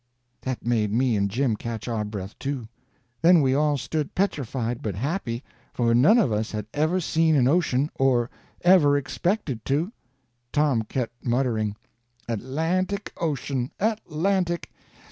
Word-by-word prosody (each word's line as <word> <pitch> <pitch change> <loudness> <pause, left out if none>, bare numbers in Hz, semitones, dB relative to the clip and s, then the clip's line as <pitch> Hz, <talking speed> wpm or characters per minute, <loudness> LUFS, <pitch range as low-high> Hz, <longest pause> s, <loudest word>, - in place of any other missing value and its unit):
That 130 -3 -4
made 110 -4 +1
me 120 +1 +2
and 100 -1 +1
Jim 120 +2 +1
catch 115 +1 -5
our 115 -3 -1
breath, 105 -2 -6
too. 135 -5 -3 0.5
Then 170 +1 +7
we 135 -3 +3
all 145 +1 +2
stood 145 +3 -3
petrified 130 - -1
but 105 -5 -3
happy, 130 - -2 0.3
for 115 -1 +2
none 145 - +6
of 215 - +3
us 110 +1 -1
had 105 -1 -3
ever 155 +5 +1
seen 160 -2 +2
an 130 -3 +4
ocean, 150 -2 +2
or 125 -3 +2 0.3
ever 170 -6 +6
expected 145 - -2
to. 155 +9 0 0.6
Tom 145 -6 +2
kept 120 +1 -4
muttering: 120 -4 0 0.5
"Atlantic 165 - -1
Ocean—Atlantic. 170 - -1
135 Hz, 135 wpm, -25 LUFS, 115-160 Hz, 0.6 s, Then